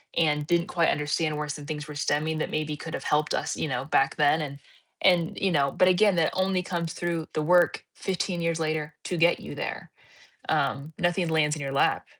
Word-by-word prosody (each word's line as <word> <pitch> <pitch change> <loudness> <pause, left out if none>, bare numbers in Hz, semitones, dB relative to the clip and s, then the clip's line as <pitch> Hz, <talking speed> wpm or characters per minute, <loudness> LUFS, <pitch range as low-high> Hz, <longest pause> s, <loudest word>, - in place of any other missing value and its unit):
and 150 -2 +1
didn't 170 0 +2
quite 170 -2 +2
understand 150 +1 0
where 150 - -3
some 145 -1 -5
things 150 -1 -5
were 150 - -7
stemming 150 +2 0
that - - -2
maybe 155 0 -2
could 165 +2 -8
have - - -6
helped 150 0 +1
us, - - -2
you 160 - -1
know, 130 -1 -2
back 135 -2 +2
then," 150 +1 +3
and 140 -1 -6 0.4
and, 175 -3 +3
you 195 -2 +2
know, 140 -3 +2
but 185 - +3
again, 195 +1 +4
that 160 - +3
only 185 0 +1
comes 170 -2 -3
through 170 -2 -2
the 155 - 0
work 175 +2 +3
15 185 -1 -2
years 165 -1 -1
later 155 -1 -2
to 180 - -2
get 170 +1 +4
you - - -8
there. - - -5 0.6
Um, 140 +3 0
nothing 175 -1 +1
lands 150 -1 +2
in 150 - -7
your 135 -1 -3
lap. 135 - +2
160 Hz, 215 wpm, -26 LUFS, 150-175 Hz, 0.6 s, again